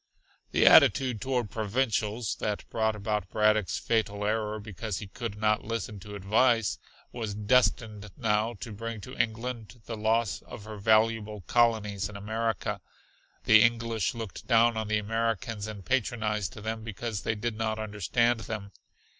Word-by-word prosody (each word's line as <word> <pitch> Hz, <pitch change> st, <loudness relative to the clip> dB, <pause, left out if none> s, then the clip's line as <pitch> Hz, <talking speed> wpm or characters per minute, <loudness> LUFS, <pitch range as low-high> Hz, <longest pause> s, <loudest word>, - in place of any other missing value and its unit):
The -, -, +3 dB
attitude 125 Hz, -6 st, +6 dB
toward 125 Hz, -6 st, -1 dB
"provincials" 110 Hz, 0 st, -1 dB
that 105 Hz, -1 st, -3 dB
brought 110 Hz, -1 st, +1 dB
about 105 Hz, -2 st, -2 dB
Braddock's 105 Hz, -2 st, +2 dB
fatal 105 Hz, -3 st, 0 dB
error 110 Hz, 0 st, -1 dB
because 105 Hz, -1 st, -5 dB
he 105 Hz, -, -5 dB
could 115 Hz, 0 st, -6 dB
not 105 Hz, 0 st, +2 dB
listen 110 Hz, -2 st, -4 dB
to 105 Hz, +2 st, -9 dB
advice, 110 Hz, +2 st, +2 dB, 0.3 s
was 110 Hz, -4 st, -4 dB
destined 105 Hz, -1 st, +1 dB
now 110 Hz, +1 st, +1 dB
to 115 Hz, -, -6 dB
bring 115 Hz, +1 st, -5 dB
to 125 Hz, +6 st, -9 dB
England 115 Hz, 0 st, -3 dB
the 115 Hz, -, -5 dB
loss 110 Hz, -2 st, +1 dB
of 105 Hz, -, -10 dB
her 110 Hz, 0 st, -8 dB
valuable 110 Hz, 0 st, +2 dB
colonies 105 Hz, -3 st, +1 dB
in 100 Hz, -, -8 dB
America. 110 Hz, 0 st, -2 dB, 0.6 s
The 110 Hz, 0 st, +7 dB
English 115 Hz, -1 st, +1 dB
looked 115 Hz, -4 st, -7 dB
down 115 Hz, -1 st, +5 dB
on 110 Hz, -1 st, -2 dB
the 105 Hz, 0 st, +1 dB
Americans 115 Hz, 0 st, -2 dB
and 105 Hz, -3 st, -8 dB
patronized 110 Hz, -3 st, -1 dB
them 110 Hz, +1 st, -4 dB
because 115 Hz, -1 st, -4 dB
they 110 Hz, -, -1 dB
did 110 Hz, +1 st, -3 dB
not 110 Hz, 0 st, -1 dB
understand 110 Hz, +3 st, +1 dB
them. 105 Hz, -2 st, -6 dB
110 Hz, 150 wpm, -28 LUFS, 105-115 Hz, 0.6 s, The